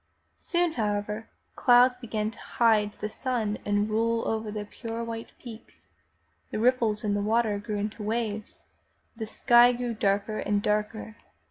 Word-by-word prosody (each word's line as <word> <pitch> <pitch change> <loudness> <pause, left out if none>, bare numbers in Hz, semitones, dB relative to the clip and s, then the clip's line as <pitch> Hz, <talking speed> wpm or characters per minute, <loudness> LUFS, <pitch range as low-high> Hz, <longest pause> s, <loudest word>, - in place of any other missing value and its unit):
Soon, 350 -1 0
however, 210 -3 -2 0.3
clouds 250 0 +5
began 220 -3 -3
to - - -16
hide 215 -3 +2
the 210 - -5
sun 220 -2 -2
and 205 0 +1
roll 230 +1 +1
down - - 0
over 220 -1 -3
the 210 0 -4
pure 230 +2 -6
white 230 0 -6
peaks. 230 -3 -13 0.6
The - - -4
ripples 230 -2 +2
in 205 -1 0
the 205 - 0
water 215 0 +1
grew 210 0 -4
into 210 +2 -4
waves, 215 -1 -3 0.5
the 225 -1 -5
sky 240 +2 +5
grew 240 -1 -3
darker 205 0 0
and 205 0 0
darker. 215 +1 -2
220 Hz, 155 wpm, -27 LUFS, 210-235 Hz, 0.6 s, clouds